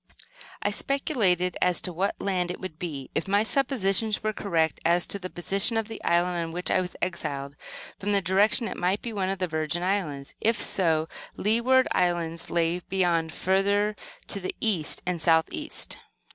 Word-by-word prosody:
I -, -, +1 dB
speculated 195 Hz, -, +1 dB
as 180 Hz, -1 st, +3 dB
to 180 Hz, -, -1 dB
what 190 Hz, +4 st, -1 dB
land 185 Hz, -3 st, 0 dB
it 180 Hz, -, -5 dB
would 185 Hz, -4 st, -7 dB
be. 145 Hz, -7 st, -5 dB
If -, -, -1 dB
my 200 Hz, +2 st, +3 dB
suppositions 220 Hz, -5 st, +1 dB
were 215 Hz, 0 st, 0 dB
correct 165 Hz, -6 st, 0 dB
as 170 Hz, +1 st, +3 dB
to 200 Hz, -, -3 dB
the 185 Hz, -1 st, -6 dB
position 195 Hz, +6 st, +2 dB
of 225 Hz, -1 st, 0 dB
the 225 Hz, -, -8 dB
island 175 Hz, +1 st, +2 dB
on 165 Hz, -, -5 dB
which 180 Hz, +2 st, -2 dB
I 185 Hz, -, +3 dB
was 180 Hz, -1 st, -6 dB
exiled, 145 Hz, -5 st, -3 dB, 0.4 s
from 205 Hz, +1 st, -2 dB
the 200 Hz, -, +4 dB
direction 200 Hz, +6 st, +2 dB
it -, -, -6 dB
might 185 Hz, +3 st, 0 dB
be 235 Hz, -, -4 dB
one 190 Hz, -2 st, -1 dB
of 195 Hz, -, -1 dB
the 185 Hz, -1 st, -1 dB
Virgin 160 Hz, +2 st, -2 dB
Islands. 165 Hz, -8 st, -2 dB
If 225 Hz, +1 st, +2 dB
so, 160 Hz, -4 st, +2 dB, 0.3 s
the -, -, -7 dB
Leeward 240 Hz, +5 st, +3 dB
Islands 170 Hz, -2 st, 0 dB
lay 170 Hz, +1 st, +1 dB
beyond, 175 Hz, -3 st, 0 dB
further 200 Hz, +4 st, +1 dB, 0.3 s
to 200 Hz, -, -1 dB
the 185 Hz, -, -3 dB
east 185 Hz, -9 st, 0 dB
and 180 Hz, -2 st, -2 dB
south 160 Hz, 0 st, +4 dB
east. 310 Hz, -1 st, -2 dB
185 Hz, 185 wpm, -26 LUFS, 170-205 Hz, 0.4 s, the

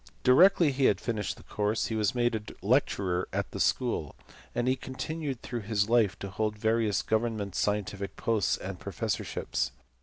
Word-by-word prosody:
Directly 170 Hz, +4 st, +6 dB
he 135 Hz, 0 st, +1 dB
had 100 Hz, -, +4 dB
finished 105 Hz, -4 st, -2 dB
his -, -, -15 dB
course 105 Hz, +2 st, 0 dB
he 115 Hz, -, -2 dB
was 105 Hz, +1 st, +1 dB
made 120 Hz, -1 st, +2 dB
a 110 Hz, -1 st, -6 dB
lecturer 90 Hz, -2 st, +1 dB
at -, -, -2 dB
the -, -, -6 dB
school, -, -, 0 dB, 0.4 s
and 120 Hz, -, 0 dB
he 130 Hz, -, +3 dB
continued 135 Hz, +1 st, -5 dB
through 120 Hz, -2 st, -4 dB
his 105 Hz, 0 st, 0 dB
life 115 Hz, -5 st, +3 dB
to 100 Hz, -, -6 dB
hold 105 Hz, +2 st, -1 dB
various 110 Hz, -1 st, +1 dB
government 110 Hz, -3 st, -1 dB
scientific 100 Hz, -1 st, -1 dB
posts 110 Hz, -6 st, +1 dB
and -, -, -6 dB
professorships. -, -, -2 dB
110 Hz, 170 wpm, -29 LUFS, 105-120 Hz, 0.4 s, Directly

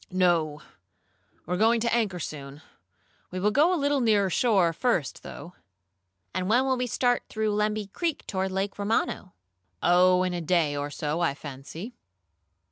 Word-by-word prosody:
"No, 170 Hz, -5 st, +1 dB, 0.8 s
we 175 Hz, -, -3 dB
are -, -, 0 dB
going 225 Hz, +3 st, +4 dB
to 235 Hz, 0 st, 0 dB
anchor 215 Hz, -6 st, +1 dB
soon. 145 Hz, -2 st, -7 dB, 0.7 s
We 185 Hz, -, -5 dB
will 210 Hz, +3 st, +2 dB
go 300 Hz, +9 st, +4 dB
a 365 Hz, -, +2 dB
little 285 Hz, -1 st, +1 dB
nearer 205 Hz, -5 st, +3 dB
shore 195 Hz, -9 st, +3 dB
first, 175 Hz, -, -1 dB
though." 175 Hz, -, -10 dB, 0.8 s
"And 185 Hz, +1 st, -2 dB
when 245 Hz, +4 st, +4 dB
will 265 Hz, -1 st, +2 dB
we 250 Hz, 0 st, -2 dB
start 245 Hz, +1 st, +1 dB
through 215 Hz, -1 st, -1 dB
Lemby 210 Hz, 0 st, 0 dB
Creek 320 Hz, -, -3 dB
toward 190 Hz, -1 st, -2 dB
Lake 195 Hz, +2 st, -3 dB
Romano?" 200 Hz, -2 st, -1 dB, 0.5 s
"Oh, 180 Hz, +1 st, +5 dB
in 185 Hz, -1 st, -1 dB
a 175 Hz, -, -3 dB
day 165 Hz, -3 st, +1 dB
or 145 Hz, 0 st, -3 dB
so, 150 Hz, +2 st, -3 dB
I 160 Hz, -5 st, +1 dB
fancy." 150 Hz, -, -8 dB
190 Hz, 165 wpm, -27 LUFS, 170-225 Hz, 0.8 s, Oh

